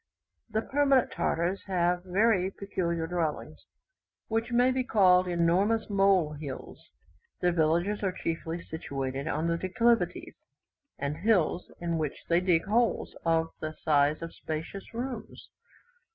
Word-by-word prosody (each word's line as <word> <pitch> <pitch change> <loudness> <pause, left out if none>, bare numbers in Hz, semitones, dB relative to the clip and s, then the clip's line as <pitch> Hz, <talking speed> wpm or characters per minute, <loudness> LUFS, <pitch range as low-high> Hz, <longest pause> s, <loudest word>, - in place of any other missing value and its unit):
The 220 0 -1
permanent 275 -2 +2
Tartars 170 +2 -1
have 175 -1 +1
very 190 0 +2
peculiar 175 -4 -2
dwellings, 165 -3 -3 0.6
which 225 +2 -1
may 245 +2 +4
be 255 0 0
called 185 -6 +4
enormous 180 +6 +1
mole 195 -6 +3
hills. 145 -3 -8 0.6
Their 180 - +2
villages 170 +5 +1
are 195 -2 0
chiefly 165 -1 -4
situated 135 -3 -4
on 165 +2 0
declivities, 230 +6 +1 0.6
and 140 +2 -3
hills, 180 -3 +1
in 170 -1 -1
which 150 -3 -2
they 170 +1 +4
dig 180 -3 +2
holes 230 +3 +1
of 165 0 +2
the 155 0 -4
size 150 +1 +2
of 165 - -6
spacious 160 +5 -6
rooms. 245 +2 -6
180 Hz, 125 wpm, -29 LUFS, 160-205 Hz, 0.6 s, may